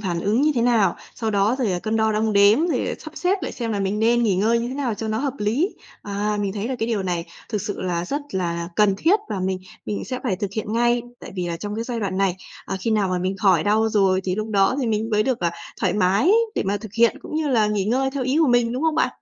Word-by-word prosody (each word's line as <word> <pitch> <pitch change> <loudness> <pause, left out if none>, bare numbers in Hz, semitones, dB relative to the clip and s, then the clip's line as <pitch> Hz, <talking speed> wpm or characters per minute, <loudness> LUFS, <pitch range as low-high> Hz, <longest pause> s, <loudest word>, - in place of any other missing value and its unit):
phản 175 -5 -2
ứng 210 +7 +1
như 305 0 +3
thế 235 - +1
nào. 235 -4 +3 0.2
Sau 225 -2 -2
đó 205 +4 +2
rồi, 220 -7 +1
à, 175 - -1
cân 220 +4 -2
đo 220 0 +2
đong 215 0 +1
đếm, 205 +11 +5
rồi, 295 -8 0
à, - - -2
sắp 315 - -10
xếp 370 +1 0
lại - - -3
xem 230 -3 -3
là 200 - -1
mình 195 +2 -1
nên 235 +2 +3
nghỉ 200 -5 +2
ngơi 225 +4 +2
như 235 +1 -2
thế 260 - -5
nào 260 -6 -1
cho 220 +1 -5
nó 215 +1 -1
hợp 280 -1 -1
lý. 235 - 0 0.3
À, 205 +1 -2
mình 195 -1 -1
thấy 210 +3 -3
là 260 - -2
cái 225 - -1
điều 215 -4 0
này 175 -2 -2 0.2
thực 210 -4 -2
sự 210 -2 -4
là 175 -1 -1
rất 285 +10 -2
là 170 -2 -2
cần 210 -2 +4
thiết 380 +7 +4
và 190 - -3
mình 185 0 -1 0.3
mình 205 - -3
sẽ 255 -1 -4
phải 205 -8 -1
thực 200 0 -3
hiện 215 0 -3
ngay. 240 +1 +2 0.2
Tại - - -9
vì 180 -2 -2
là 170 - -3
trong 205 +3 -5
cái 230 +1 -3
giai 240 -2 -3
đoạn 190 -3 -2
này, 190 -2 +1 0.3
à, - - -3
khi 225 - -1
nào 210 -3 +2
mà 180 -1 0
mình 185 +2 -2
khỏi 185 -5 +3
đau 220 +2 +3
rồi 195 -3 +2
thì 185 -1 0
lúc 215 +1 -3
đó 200 +4 +3
thì 250 - -1
mình 220 +1 -1
mới 210 0 +3
được, 255 0 0
ờ, 170 - +1 0.3
thoải - - +2
mái 205 - +3 0.2
để - - 0
mà 200 - +1
thực 210 0 -9
hiện, 235 -1 +4
cũng - - -8
như 310 -2 0
là 225 -5 +3
nghỉ 210 -2 0
ngơi 265 +5 +1
theo 270 -1 -3
ý 260 +4 +1
của 315 - +5
mình, 240 -1 +3
đúng 260 +5 -3
không 320 -1 +2
bạn? - - +2
215 Hz, 295 wpm, -22 LUFS, 195-240 Hz, 0.3 s, đếm